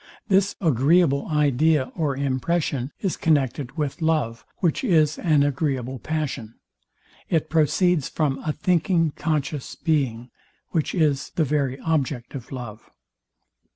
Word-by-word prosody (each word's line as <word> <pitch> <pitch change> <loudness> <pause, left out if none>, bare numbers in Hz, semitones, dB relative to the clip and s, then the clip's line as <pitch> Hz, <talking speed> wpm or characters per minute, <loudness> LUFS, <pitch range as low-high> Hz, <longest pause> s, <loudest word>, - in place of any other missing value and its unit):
This 195 +1 +3
agreeable 150 - +3
idea 150 -1 +2
or 145 -5 -1
impression 140 0 -1
is 190 -4 -1
connected 140 -2 0
with 150 +1 -2
love, 150 -8 0
which 175 - 0
is 155 - +3
an 155 -4 +3
agreeable 135 -3 -1
passion. 140 -8 -4 0.7
It 160 -4 0
proceeds 165 0 +2
from 145 -4 -1
a 155 - 0
thinking 165 0 +1
conscious 150 -3 -3
being, 130 -7 -1 0.4
which 160 +1 -1
is 150 -5 +1
the 165 -4 +2
very 140 -2 -1
object 140 -6 -1
of 130 -4 -8
love. 120 -4 -8
150 Hz, 120 wpm, -24 LUFS, 135-160 Hz, 0.7 s, This